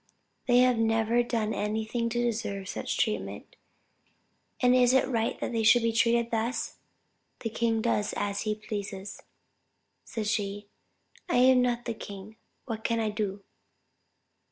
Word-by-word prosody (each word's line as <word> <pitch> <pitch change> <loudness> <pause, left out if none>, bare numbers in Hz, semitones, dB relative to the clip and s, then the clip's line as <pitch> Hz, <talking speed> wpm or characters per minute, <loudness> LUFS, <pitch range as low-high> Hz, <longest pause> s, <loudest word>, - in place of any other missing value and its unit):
They 245 0 +6
have 250 -2 +3
never 225 +1 +2
done 225 -3 -1
anything 220 +3 -1
to 240 +1 -2
deserve 210 -5 -2
such - - -3
treatment; - - -2 1.0
and 250 -1 +4
is 250 0 +5
it 265 - +4
right 230 -3 -1
they 230 -2 -1
should 225 +2 +5
be 230 0 +1
treated 235 0 +2
thus? 230 +1 -2 0.6
'The 225 - -3
king 225 0 0
does 210 -3 +1
as 200 0 -1
he 215 -1 -1
pleases,' 205 -2 -6 0.8
said 220 -2 -4
she, 205 -1 -2 0.6
'I - - +1
am 255 0 +6
not 240 -1 0
the 235 - -2
king, 205 0 -10 0.3
what 220 -3 -5
can 230 0 0
I 220 -1 0
do?' 205 -2 -3
225 Hz, 145 wpm, -28 LUFS, 210-240 Hz, 1.0 s, They